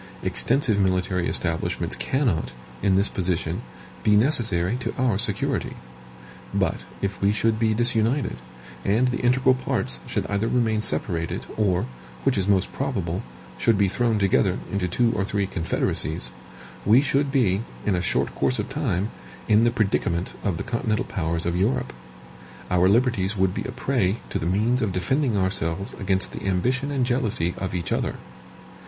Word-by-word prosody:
Extensive 125 -5 +2
military 90 -2 +1
establishments 85 -2 -1
cannot, 105 - 0 0.3
in 95 -1 +3
this 100 +2 +4
position, 90 -2 -1 0.4
be 105 - +4
necessary 110 - +2
to - - -4
our 125 -7 +1
security. - - 0 0.8
But - - +1 0.3
if 100 -2 -2
we 100 +1 +4
should 110 +1 +1
be 110 -1 +2
disunited, 120 - +1 0.5
and 115 +6 +2
the 125 - -2
integral 130 +1 +4
parts 65 - 0
should - - -2
either 100 +2 -1
remain 115 -3 +1
separated, 85 -6 -1
or, 95 -4 +1 0.4
which - - +2
is 95 -1 +1
most 95 -2 +2
probable, 95 -11 -2 0.4
should 115 -3 +3
be 100 0 +3
thrown 115 +3 +1
together 95 -1 +2
into 95 -2 0
two 115 +6 +2
or 100 - 0
three 100 0 -1
confederacies, 80 -4 -1 0.5
we 115 +7 +5
should 140 0 +1
be, 110 -8 +2 0.2
in 105 - +2
a 90 - 0
short - - 0
course 130 - 0
of - - -3
time, 115 - -1 0.4
in 110 +1 +5
the - - +5
predicament 95 -6 0
of 95 -6 0
the - - -3
continental 115 0 -1
powers 85 -3 -2
of 85 0 0
Europe 65 -8 0 0.8
our 90 +1 +4
liberties 110 -3 +2
would 95 -1 +2
be - - -4
a 130 - -4
prey 120 -6 0
to - - -1
the 80 - -2
means 110 +7 +2
of 100 -4 0
defending 120 - +1
ourselves 95 -1 0
against 95 -1 -1
the - - -7
ambition 125 +9 0
and 135 -3 0
jealousy 110 - 0
of 95 -1 -3
each 85 - -3
other. - - 0
100 Hz, 160 wpm, -24 LUFS, 90-120 Hz, 0.8 s, we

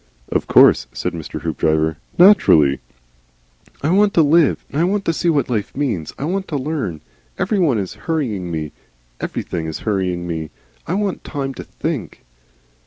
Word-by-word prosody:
"Of - - -1
course," - - +6
said - - -3
Mr. 80 -2 -6
Hoopdriver. 80 0 0 0.2
"Naturally." 80 - +6 1.0
"I 155 - +2
want 200 +2 +3
to 165 - +6
Live, 155 0 +3
and 150 - 0
I - - +4
want 195 +3 0
to 165 - +1
see 170 +2 0
what 145 -6 +2
life 110 -2 -3
means. 110 - -2
I 140 - -3
want 190 +4 -2
to 150 - -2
learn. 130 - -3 0.4
Everyone 180 - +1
is 95 -3 -3 0.2
hurrying 115 - -1
me, 80 -2 -4 0.5
everything 80 -2 -4
is 80 - -5
hurrying 95 -4 -1
me; 80 -2 -4 0.4
I 170 - -1
want 200 -2 -2
time 135 -2 -4
to - - -8
think." - - -5
130 Hz, 165 wpm, -19 LUFS, -, 1.0 s, course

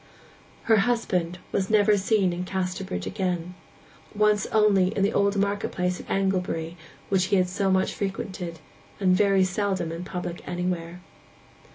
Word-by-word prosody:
Her 225 -1 +4
husband 195 -6 0
was 190 -1 -1
never 210 -1 +4
seen 195 -2 +2
in 175 +1 -3
Casterbridge 185 +1 -3
again; 180 -3 -2 0.6
once 210 -1 +3
only 210 -4 +4
in 195 - +2
the 205 - +2
old 200 0 +2
market 200 +1 0
place 180 0 -1
at - - -11
Anglebury, 180 -4 -1 0.3
which 190 -2 +2
he 200 - +1
had 185 -1 +3
so 195 +2 -1
much 190 0 +2
frequented, 185 -4 -4 0.4
and 185 -2 +4
very 195 -1 +4
seldom 185 -2 -1
in 165 +2 -5
public 180 -1 -5
anywhere. 180 -1 -3
190 Hz, 150 wpm, -25 LUFS, 180-200 Hz, 0.6 s, Her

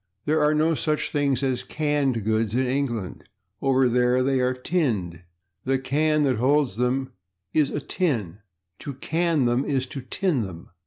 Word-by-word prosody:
There 155 +1 +2
are 150 +1 +3
no 160 +2 +3
such 155 0 -1
things 140 -3 +1
as 130 -2 0
/canned 145 -6 0
goods/ 110 0 0
in 130 +1 +2
England; 125 -7 -2 0.4
over 135 -1 +3
there 125 +1 +2
they 135 0 +1
are 125 0 +1
/tinned/. 115 - -1 0.4
The 135 +1 +1
/can/ 150 +4 +1
that 130 -5 +1
holds 130 -2 +2
them 130 +2 0 0.4
is 150 -3 +3
a - - -3
/tin/; 120 - -2 0.4
/to 140 -3 -7
can/ 165 -3 +1
them 120 +2 +2
is 135 -3 -1
/to 130 -2 -9
tin/ 180 - 0
them.... 90 -6 -8
130 Hz, 165 wpm, -24 LUFS, 125-150 Hz, 0.4 s, are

